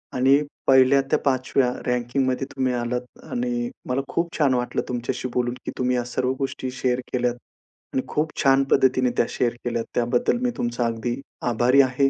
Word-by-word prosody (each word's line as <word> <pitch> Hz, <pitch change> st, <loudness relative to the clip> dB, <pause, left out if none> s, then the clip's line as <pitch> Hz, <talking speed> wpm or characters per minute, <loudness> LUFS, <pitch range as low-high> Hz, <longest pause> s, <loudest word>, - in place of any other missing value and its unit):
आणि 130 Hz, +2 st, +5 dB, 0.3 s
1ल्या 130 Hz, +1 st, +6 dB
त्या -, -, +3 dB
5व्या 130 Hz, -1 st, +2 dB
रँकिंगमध्ये 125 Hz, +2 st, 0 dB
तुम्ही 130 Hz, -2 st, +1 dB
आलात. 120 Hz, 0 st, -1 dB, 0.3 s
आणि 245 Hz, -1 st, -1 dB, 0.2 s
मला 130 Hz, +2 st, +1 dB
खूप 170 Hz, +3 st, -2 dB
छान 140 Hz, -4 st, +3 dB
वाटलं 125 Hz, -1 st, 0 dB
तुमच्याशी 125 Hz, +1 st, -2 dB
बोलून, 120 Hz, -1 st, 0 dB
की -, -, -3 dB
तुम्ही 125 Hz, 0 st, +1 dB
या 120 Hz, -, 0 dB
सर्व 125 Hz, +1 st, -1 dB
गोष्टी 130 Hz, -1 st, -3 dB
शेअर 125 Hz, -1 st, +1 dB
केल्यात. 125 Hz, -1 st, +1 dB, 0.6 s
आणि 130 Hz, -, +1 dB
खूप 155 Hz, +1 st, -2 dB
छान 135 Hz, -1 st, +5 dB
पद्धतीने 130 Hz, -1 st, +4 dB
त्या -, -, +4 dB
शेअर 120 Hz, -1 st, 0 dB
केल्यात. 115 Hz, -2 st, -2 dB
त्याबद्दल 120 Hz, -, +2 dB
मी 250 Hz, -1 st, +1 dB
तुमचा 120 Hz, 0 st, -1 dB
अगदी 115 Hz, +2 st, -2 dB, 0.3 s
आभारी 125 Hz, +4 st, +5 dB
आहे. 135 Hz, +1 st, +2 dB
125 Hz, 170 wpm, -24 LUFS, 120-135 Hz, 0.6 s, 1ल्या